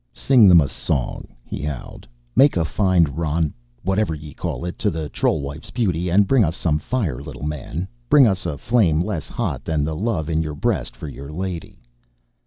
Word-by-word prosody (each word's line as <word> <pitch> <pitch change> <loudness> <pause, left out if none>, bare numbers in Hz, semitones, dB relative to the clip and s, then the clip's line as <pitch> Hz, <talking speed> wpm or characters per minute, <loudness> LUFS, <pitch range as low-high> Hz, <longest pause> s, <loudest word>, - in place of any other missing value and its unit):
"Sing 125 -6 +5
them 90 -2 +8
a 75 - +2
song," 65 -1 -2 0.2
he - - -6
howled. 75 -4 -6 0.3
"Make 140 -7 +5
a 85 - +2
fine 95 -1 +3
roun 80 +1 -1 0.3
whatever 95 -2 +1
ye 75 -1 -10
call - - -4
it 90 - -5
to 105 - +2
the 80 -4 -4
troll 80 - 0
wife's 70 +3 -7
beauty. 90 -7 0
And 100 +4 +4
bring 130 -1 +4
us 80 -1 0
some 75 -4 0
fire, 85 - -2
little 70 - -9
man, 75 +4 -4 0.2
bring 145 -3 +7
us 95 -4 +1
a 75 - -3
flame 95 - +2
less 95 -9 -3
hot - - -3
than 80 -3 0
the 80 +1 -2
love 95 -4 -1
in 80 -1 +1
yer 75 -2 -4
breast - - -1
for - - -7
yer 70 0 -8
lady!" 85 -3 -6
80 Hz, 195 wpm, -22 LUFS, 75-95 Hz, 0.3 s, them